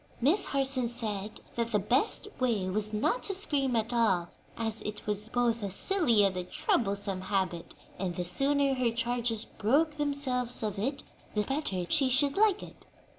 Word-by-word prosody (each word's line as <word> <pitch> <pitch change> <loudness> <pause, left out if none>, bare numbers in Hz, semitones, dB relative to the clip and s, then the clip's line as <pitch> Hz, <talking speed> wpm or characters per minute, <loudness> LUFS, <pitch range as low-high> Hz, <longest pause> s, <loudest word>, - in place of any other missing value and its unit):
Miss 310 - +2
Harson 270 -3 0
said 215 -4 -3
that 235 0 -2
the 210 - +3
best 240 +7 +2
way 230 -7 0
was 210 +3 -1
not 215 - 0
to 390 - +2
scream 285 - +2
at 225 +1 -1
all, 190 -8 +1 0.3
as 225 -1 -3
it 210 0 -6
was 210 +1 +1
both 240 -1 0
a 200 - -3
silly 240 - +2
and 195 -2 +1
a 180 - -3
troublesome 200 -6 -1
habit, 185 -3 -3 0.2
and 180 -2 -3
the 180 - -3
sooner 275 +7 +3
her 255 -2 +1
charges 235 -1 -1
broke 295 +9 0
themselves 265 -5 0
of 210 -2 -3
it 270 +6 -2 0.3
the 210 - +1
better 270 - -2
she 270 +5 +3
should 280 +2 +2
like 420 -1 +2
it. - - -13
235 Hz, 175 wpm, -29 LUFS, 205-275 Hz, 0.3 s, the